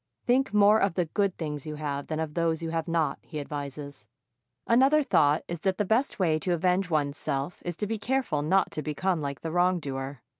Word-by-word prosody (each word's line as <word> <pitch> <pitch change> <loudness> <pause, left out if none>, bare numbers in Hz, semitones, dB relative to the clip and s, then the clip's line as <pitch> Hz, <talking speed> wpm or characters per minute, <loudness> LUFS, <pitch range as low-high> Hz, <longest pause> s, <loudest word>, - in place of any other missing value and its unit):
Think 265 +2 +2
more 210 +1 +5
of 195 -5 +1
the 180 - +1
good 195 +4 -1
things 150 -3 -5
you 155 - -4
have 145 -2 -4
than 155 0 -3
of 160 -2 -3
those 165 -1 0
you 165 - -3
have 165 -1 -2
not, 165 -2 0
he 155 - -7
advises. 140 -5 -6 0.6
Another 270 +6 +4
thought 150 - +3
is 170 -1 -4
that 190 +2 0
the 210 - 0
best 225 +7 +1
way 160 -5 +2
to 175 +3 0
avenge 180 +2 +1
one's 145 -3 0
self 140 +5 -3
is 175 -1 -4
to 210 - -2
be 220 +1 -3
careful 245 - 0
not 190 +6 +2
to 155 - -4
become 160 +3 -1
like 140 -1 -4
the 165 - -4
wrongdoer. 145 -7 -1
165 Hz, 215 wpm, -27 LUFS, 150-195 Hz, 0.6 s, more